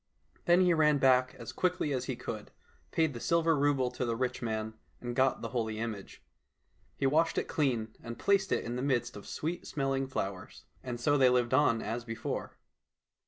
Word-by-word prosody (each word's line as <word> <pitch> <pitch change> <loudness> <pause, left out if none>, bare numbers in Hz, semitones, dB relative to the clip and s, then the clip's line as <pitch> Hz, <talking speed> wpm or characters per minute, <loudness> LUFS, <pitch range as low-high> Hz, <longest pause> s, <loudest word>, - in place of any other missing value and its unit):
Then 175 +1 +5
he 180 -1 +4
ran 150 -2 +4
back 130 -1 +3
as 115 - -7
quickly 180 -5 0
as 130 -1 -2
he - - -3
could, - - -6 0.4
paid 160 -3 +1
the 120 - -6
silver 165 +3 +2
rouble 140 -3 +2
to - - -3
the 115 -2 -1
rich 125 +1 -2
man, 110 -2 -2 0.3
and 120 -1 -5
got 130 -1 +2
the 115 - -3
holy 110 -2 -2
image. 110 -3 -6 0.7
He - - -1
washed 160 +4 +2
it - - +2
clean 120 -7 -1
and 115 -1 -7
placed 195 -2 +2
it - - +1
in 120 +1 -3
the - - -2
midst 120 -3 0
of 100 - -10
sweet 165 +3 -4
smelling 135 -2 -1
flowers. 95 -7 -5 0.2
And 120 -2 -5
so 145 +4 +2
they 130 -1 +6
lived 125 0 +2
on 130 -4 +3
as 115 +3 -3
before. 115 -1 -5
130 Hz, 195 wpm, -31 LUFS, 115-145 Hz, 0.7 s, they